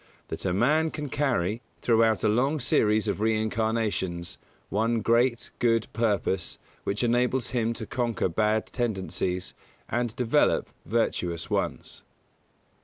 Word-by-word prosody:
That - - -5
a 95 - +1
man 150 - +3
can 150 -2 -5
carry, 120 -7 0 0.2
throughout 115 -2 +3
a - - +4
long 130 +8 +2
series 110 -3 +2
of 100 0 -1
reincarnations, 110 -5 -1 0.3
one 115 +2 +1
great, 115 +2 +2
good 115 -2 +3
purpose 100 -5 0 0.3
which 100 +4 -1
enables 125 +1 +1
him 115 -3 +1
to 110 - -6
conquer 120 -2 -1
bad 105 +5 +1
tendencies 95 -6 -2 0.3
and 120 -1 -1
develop 125 -3 +2 0.2
virtuous 90 -7 -1
ones. - - -2
115 Hz, 120 wpm, -27 LUFS, 105-120 Hz, 0.3 s, a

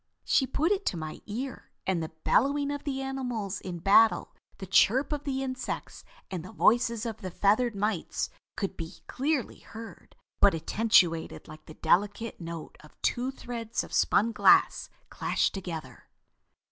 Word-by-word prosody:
She 265 - +3
put 320 +8 +1
it 400 -1 +1
to 175 - 0
my 155 -1 -6
ear, 245 +5 -5 0.2
and 185 -3 0
the 160 - -4
bellowing 280 +3 +2
of 285 +1 -5
the 270 -2 -2
animals 245 -7 -3
in 180 -2 -5
battle, 205 +6 +4 0.2
the 190 - -7
chirp 245 +9 +4
of 290 -1 -4
the 270 -1 -1
insects 255 -1 -5 0.3
and 180 -4 -4
the 185 - -10
voices 235 0 +2
of 225 -3 -4
the 185 - -6
feathered 210 +6 +2
mites 200 -3 -1 0.3
could 195 - -2
be 165 -1 -8
clearly 275 -1 -1
heard, 225 0 -11 0.2
but 200 -4 +5
attenuated 175 -2 +2
like 155 0 -13
the 155 - -11
delicate 205 +3 0
note 165 -1 -7
of 150 - -18
two 245 +2 +1
threads 240 -3 -4
of - - -11
spun 225 +3 +3
glass - - +4 0.2
clashed - - 0
together." 180 -5 -7
220 Hz, 160 wpm, -28 LUFS, 185-260 Hz, 0.3 s, but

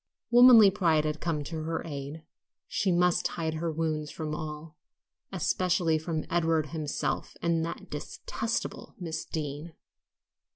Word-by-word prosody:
Womanly 240 -4 +9
pride 165 -6 +2
had 155 0 -2
come 160 -4 -1
to 160 +2 -5
her 165 +1 -3
aid; 145 +1 -6 0.4
she 195 - 0
must 180 0 +3
hide 160 -1 -3
her 165 +1 -2
wounds 155 -1 -2
from 155 -1 -5
all, 150 0 -6 0.6
especially 175 -3 +1
from 160 -1 -3
Edward 165 -3 +1
himself 150 -2 -3
and 165 -1 +1
"that 165 - -6
detestable 220 +9 -4
Miss 165 -3 -4
Deane." 150 +1 -5
160 Hz, 130 wpm, -29 LUFS, 155-170 Hz, 0.6 s, Womanly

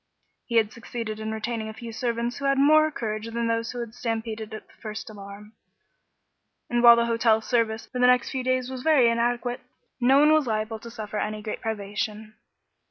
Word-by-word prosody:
He 235 - -3
had 220 -2 +3
succeeded 230 -2 -6
in 220 0 -4
retaining 220 0 -3
a 220 - -9
few 230 +1 -8
servants 235 +1 -2
who 280 - -4
had 275 0 +2
more 310 +3 +5
courage 215 -6 -4
than 235 0 -2
those 230 0 -1
that 245 - -5
had 230 -2 -7
stampeded 225 -2 -4
at 215 - -8
the - - -24
first 215 0 -6
alarm, 205 +1 -11 1.2
and 240 0 +2
while 235 -1 +9
the 235 0 +2
hotel 230 -1 +3
service 225 -1 0
for 250 - -6
the 250 - +5
next 250 -1 +3
few 260 -1 -3
days 255 0 0
was 260 -1 -5
very 265 -6 +4
inadequate, 240 +1 -1 0.4
no 260 +2 +5
one 300 +2 +6
was 310 -4 +3
liable 220 0 -2
to 235 - -10
suffer 215 -2 -6
any 210 0 -3
great 215 - -5
privation. 215 0 -4
230 Hz, 200 wpm, -25 LUFS, 220-245 Hz, 1.2 s, while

